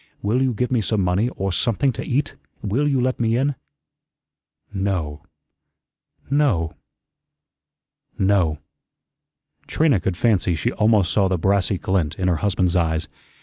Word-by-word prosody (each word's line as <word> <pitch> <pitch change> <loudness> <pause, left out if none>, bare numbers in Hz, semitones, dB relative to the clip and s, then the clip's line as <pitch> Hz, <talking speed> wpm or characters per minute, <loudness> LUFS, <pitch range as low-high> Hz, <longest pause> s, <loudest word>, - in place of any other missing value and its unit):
Will 110 +6 +1
you 130 -1 +2
give 125 +3 -1
me 120 -3 +2
some 105 0 0
money, 90 +6 +1
or 95 0 -2
something 120 +8 +1
to - - -5
eat? 140 +3 -1 0.3
Will 120 +8 0
you 135 -3 +1
let 130 +1 0
me 115 0 +1
in?" 140 +3 +1 1.2
"No 90 -7 -2 1.1
no 130 - +1 1.4
no." 95 -6 +2 1.1
Trina 150 -10 +2
could 90 -1 -2
fancy 100 -6 +2
she 80 - -1
almost 105 -4 +2
saw 100 -2 +3
the 95 -1 0
brassy 95 +2 +1
glint 90 -5 -1
in 95 - -1
her 85 - +1
husband's 90 0 0
eyes. 80 -2 0
100 Hz, 140 wpm, -22 LUFS, 90-120 Hz, 1.4 s, saw